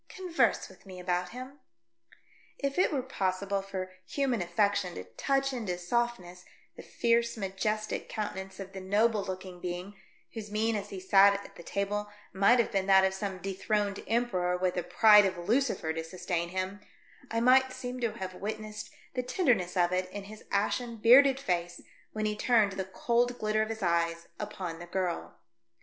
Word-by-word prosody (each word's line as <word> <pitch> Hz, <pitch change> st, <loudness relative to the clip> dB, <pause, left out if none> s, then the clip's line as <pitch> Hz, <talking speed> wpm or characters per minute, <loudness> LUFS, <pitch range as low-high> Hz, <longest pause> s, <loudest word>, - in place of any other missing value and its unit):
Converse 365 Hz, -3 st, +1 dB
with -, -, -18 dB
me 185 Hz, -1 st, -9 dB
about 180 Hz, 0 st, -1 dB
him," 255 Hz, +4 st, -9 dB, 1.0 s
If 275 Hz, +3 st, -2 dB
it -, -, +4 dB
were 275 Hz, -4 st, -1 dB
possible 195 Hz, 0 st, -1 dB
for 190 Hz, -1 st, -5 dB, 0.2 s
human 265 Hz, -7 st, 0 dB
affection 180 Hz, +1 st, +1 dB
to 90 Hz, -, -5 dB
touch 270 Hz, -, -1 dB
into 210 Hz, -8 st, -3 dB
softness 180 Hz, -2 st, -2 dB, 0.3 s
the -, -, -9 dB
fierce 235 Hz, 0 st, +1 dB
majestic 215 Hz, +2 st, -2 dB
coun 215 Hz, -2 st, -3 dB
tenance 190 Hz, 0 st, -8 dB
of 195 Hz, -1 st, -8 dB
the 190 Hz, -, -6 dB
noble 210 Hz, +2 st, +2 dB
looking 185 Hz, -2 st, -7 dB
being, 180 Hz, +2 st, -5 dB, 0.4 s
whose 220 Hz, -2 st, -6 dB
mien 220 Hz, +2 st, 0 dB
as 205 Hz, -1 st, -4 dB
he 195 Hz, -, -6 dB
sate 195 Hz, +2 st, +6 dB
at 200 Hz, -, -8 dB
the -, -, -10 dB
table 205 Hz, +3 st, -2 dB, 0.2 s
might 200 Hz, +6 st, +5 dB
have 235 Hz, -, +1 dB
been 195 Hz, -1 st, 0 dB
that 190 Hz, -1 st, +6 dB
of 190 Hz, -, +1 dB
some 190 Hz, 0 st, -4 dB
dethroned 200 Hz, +2 st, -2 dB
emperor, 185 Hz, -7 st, +1 dB
with 180 Hz, 0 st, 0 dB
the 180 Hz, -, -1 dB
pride 205 Hz, +3 st, +6 dB
of 185 Hz, -, -4 dB
Lucifer 210 Hz, -3 st, 0 dB
to 165 Hz, 0 st, -3 dB
sustain 170 Hz, 0 st, -3 dB
him, 185 Hz, +2 st, -3 dB, 0.5 s
I 230 Hz, -, 0 dB
might 260 Hz, +2 st, +5 dB
seem 250 Hz, 0 st, -6 dB
to 235 Hz, -3 st, -1 dB
have 190 Hz, -4 st, -6 dB
witnessed 215 Hz, +2 st, -6 dB, 0.2 s
the 250 Hz, -, -1 dB
tenderness 245 Hz, -, +1 dB
of 175 Hz, 0 st, +3 dB
it 185 Hz, 0 st, 0 dB
in 200 Hz, +1 st, -7 dB
his 210 Hz, +2 st, -12 dB
ashen, 230 Hz, +4 st, -1 dB
bearded 265 Hz, +5 st, +7 dB
face 175 Hz, -7 st, -2 dB, 0.3 s
when 215 Hz, 0 st, -2 dB
he 210 Hz, 0 st, 0 dB
turned 215 Hz, -2 st, +3 dB
the 190 Hz, 0 st, -3 dB
cold 240 Hz, +5 st, 0 dB
glitter 215 Hz, -1 st, +1 dB
of 215 Hz, -, -1 dB
his 220 Hz, -2 st, -4 dB
eyes 170 Hz, -1 st, 0 dB
upon 170 Hz, -3 st, -5 dB
the 175 Hz, -, -9 dB
girl. 180 Hz, -1 st, -3 dB
200 Hz, 180 wpm, -30 LUFS, 185-230 Hz, 1.0 s, bearded